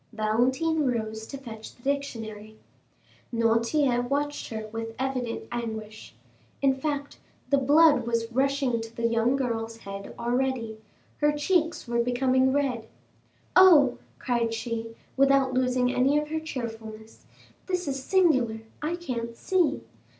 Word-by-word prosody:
Valentine 255 +9 +1
rose 220 -2 -2
to 275 - -7
fetch 225 -5 -10
the 240 - -24
dictionary. 220 -6 -4 0.7
Noirtier 235 +3 +2
watched 285 +3 -2
her 220 -1 -5
with 225 +1 -5
evident 255 -3 -2
anguish. 220 -2 -6 0.4
In 275 -1 +3
fact, 285 +1 -4 0.3
the 280 - +5
blood 290 -2 +5
was 230 0 -1
rushing 265 -2 +1
to 225 0 -9
the 230 - -2
young 230 +2 +2
girl's 230 -4 -2
head 200 -2 -8
already, 240 -2 -1 0.4
her 295 0 +3
cheeks 325 0 0
were 235 0 +1
becoming 260 +2 +2
red. 260 -5 -1 0.7
"Oh," 320 -9 +7 0.2
cried 235 -2 0
she, 225 -1 -4 0.2
without 275 -1 +4
losing 255 0 +1
any 270 +3 +3
of 300 0 -1
her 315 +1 -1
cheerfulness, 225 -7 -7 0.4
"this 360 -3 -2
is 270 -1 -2
singular! 260 -12 +2 0.2
I 310 +3 -1
can't 235 -9 -5
see! 355 - +1
250 Hz, 130 wpm, -27 LUFS, 225-280 Hz, 0.7 s, Oh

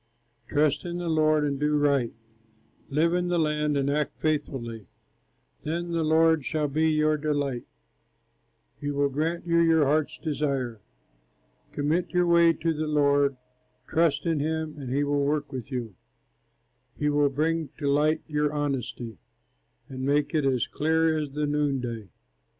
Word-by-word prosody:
Trust 145 -1 +1
in 175 0 -4
the 175 -1 -4
Lord 155 -1 +3
and 140 -2 -1
do 150 0 +2
right, 140 -5 +2 0.8
Live 160 +4 +2
in 180 0 0
the 175 0 +1
land 150 -2 +1
and 140 0 0
act 150 +1 -1
faithfully. 120 - -2 0.7
Then 170 +3 -3
the 165 -1 0
Lord 160 -1 +3
shall 150 +1 -1
be 155 +3 +1
your 155 0 +2
delight, 145 -4 -2 1.1
He 145 - -3
will 145 0 +1
grant 160 +5 -2
you 170 -1 +2
your 165 -2 +4
heart's 150 +2 +1
desire. 140 -7 -2 0.9
Commit 155 +5 0
your 180 -1 +2
way 170 -1 +5
to 165 +1 -1
the 155 0 -3
Lord, 140 -2 +2 0.5
Trust 165 -1 +1
in 165 -3 +1
him, 160 +1 -2
and 130 -3 -6
he 140 +2 +1
will 145 0 +1
work 145 +1 -1
with 130 -1 -6
you, 120 -5 -4 1.0
He 150 - 0
will 145 -1 +3
bring 160 +2 -1
to 145 - -3
light 150 +3 +2
your 150 -1 0
honesty, 130 -6 -3 0.7
And 130 -1 -7
make 145 +3 +1
it 155 -3 +1
as 130 -3 +2
clear 160 +1 +1
as 150 -2 -2
the 150 +1 -1
noonday. 135 -8 -2
150 Hz, 155 wpm, -26 LUFS, 140-160 Hz, 1.1 s, way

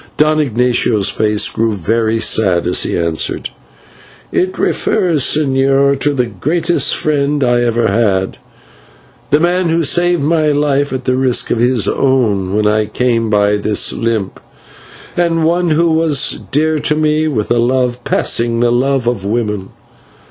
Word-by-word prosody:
Don 155 +1 +2
Ignatio's 120 -5 +1
face 105 -1 +1
grew 115 0 -1
very 110 +4 -1
sad 95 -6 +1
as - - +1
he - - -2
answered: 85 -2 -2 0.8
"It 185 +1 -1
refers, 175 -9 0
señor, 135 -1 +1
to 145 0 -1
the 125 -2 0
greatest 155 - 0
friend 145 -1 0
I 120 -1 +2
ever 120 -1 0
had, 100 -5 0 0.9
the 145 - +3
man 175 +1 0
who 165 +1 +1
saved 175 +1 +1
my 155 +1 +1
life 145 -1 0
at 130 -1 -5
the 130 - +1
risk 130 -2 0
of 115 - 0
his 120 -4 +1
own 105 -9 0
when 105 0 +1
I 105 0 +1
came 115 0 -1
by 105 -1 +2
this 105 0 0
limp, 115 -4 -3 0.8
and 165 -2 0
one 175 +1 +1
who 165 +2 +2
was 160 -3 0
dear 155 +2 0
to 150 - 0
me 155 0 0
with 115 -9 -3
a 120 - +2
love 125 0 0
passing 115 -1 0
the 120 0 +2
love 130 +1 0
of 120 -5 -2
woman. 105 -2 -3
125 Hz, 155 wpm, -14 LUFS, 110-150 Hz, 0.9 s, the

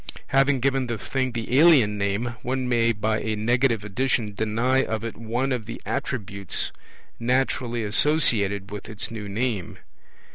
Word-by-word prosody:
Having 135 -1 +3
given 135 -1 +1
the 120 -1 -2
thing 130 +4 -2
the 120 +3 0
alien 140 -11 +6
name, 100 +4 -1
one 130 0 -2
may 115 -1 +3
by 110 0 -1
a 110 0 -2
negative 115 +1 +1
addition 110 0 -1
deny 115 +6 +1
of 110 0 -3
it 115 - -5
one 120 +4 -2
of 120 -4 -2
the 115 - -6
attributes 100 -8 -3 0.5
naturally 125 -1 0
associated 105 -5 +3
with 105 +1 -7
its 110 +1 -5
new 105 -3 -6
name. 105 -3 -2
115 Hz, 150 wpm, -24 LUFS, 105-130 Hz, 0.5 s, alien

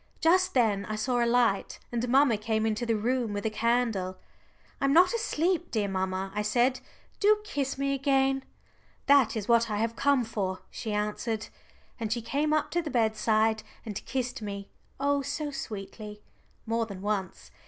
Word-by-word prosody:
Just 365 +1 +3
then 215 -5 +3
I 215 - -3
saw 240 +3 +1
a 235 - +2
light, 235 -5 +2
and 240 0 -1
mamma 265 -2 +5
came 220 +1 -1
into 220 +2 -1
the 230 - +2
room 235 0 0
with 205 +1 -4
a 220 - +1
candle. 220 -5 0 0.6
"I'm 275 0 +3
not 360 +5 +6
asleep, 355 -6 0
dear 210 -3 0
mamma," 190 0 -2
I 210 - -1
said. 240 +5 +2 0.4
"Do 420 +1 +5
kiss 280 -10 -2
me 275 0 0
again." 270 -1 +2 0.6
"That 280 -5 +5
is 205 - -4
what 235 -1 +4
I 210 - -1
have 225 +2 -1
come 280 -1 +3
for," 195 -4 -3
she 220 - -5
answered. 210 +1 -2 0.5
And 220 -2 -3
she 235 - +1
came 285 +6 0
up 310 -1 +1
to 345 - +1
the 315 - -5
bedside 220 -2 +2 0.2
and 210 -3 -5
kissed 255 -1 -2
me, 200 -1 -6 0.3
oh 285 0 +2
so 295 +2 -3
sweetly 210 -3 -7 0.4
more 230 0 0
than 195 -2 -8
once. 190 - -3
230 Hz, 175 wpm, -28 LUFS, 210-270 Hz, 0.6 s, not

